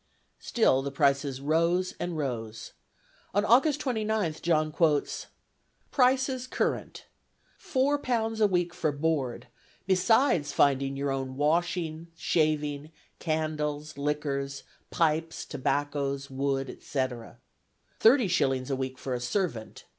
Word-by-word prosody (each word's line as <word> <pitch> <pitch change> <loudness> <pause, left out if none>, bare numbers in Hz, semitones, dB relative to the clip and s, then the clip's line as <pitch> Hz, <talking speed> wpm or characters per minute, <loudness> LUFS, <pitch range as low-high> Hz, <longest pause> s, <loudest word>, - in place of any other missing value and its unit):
Still 175 - +2
the 140 - -3
prices 140 -1 +1
rose 170 +5 +1
and 175 -2 -3
rose. 115 -6 -4 0.6
On 205 +1 +3
August 275 +6 +4
29th, 220 - -1
John 155 -2 +1
quotes: 150 -2 +1 0.6
"Prices 260 -1 +2
current. - - -2 0.5
Four 280 +2 +1
pounds 225 -4 -1
a 210 - +6
week 175 -2 0
for 155 - 0
board, 145 -4 -1 0.4
besides 190 - +3
finding 135 -1 +2
your 140 0 -1
own 135 -1 -3
washing, 165 +1 0
shaving, 150 -2 0 0.3
candles, 155 -2 -2
liquors, 140 -1 -2 0.3
pipes, 165 0 0
tobacco, 140 0 -1
wood, 135 0 -1
etc. 130 -5 -4 0.6
Thirty 235 0 +5
shillings 135 -7 +1
a - - +1
week 130 0 -4
for 130 0 -4
a 125 - -1
servant. 125 - -3
155 Hz, 115 wpm, -28 LUFS, 140-185 Hz, 0.6 s, a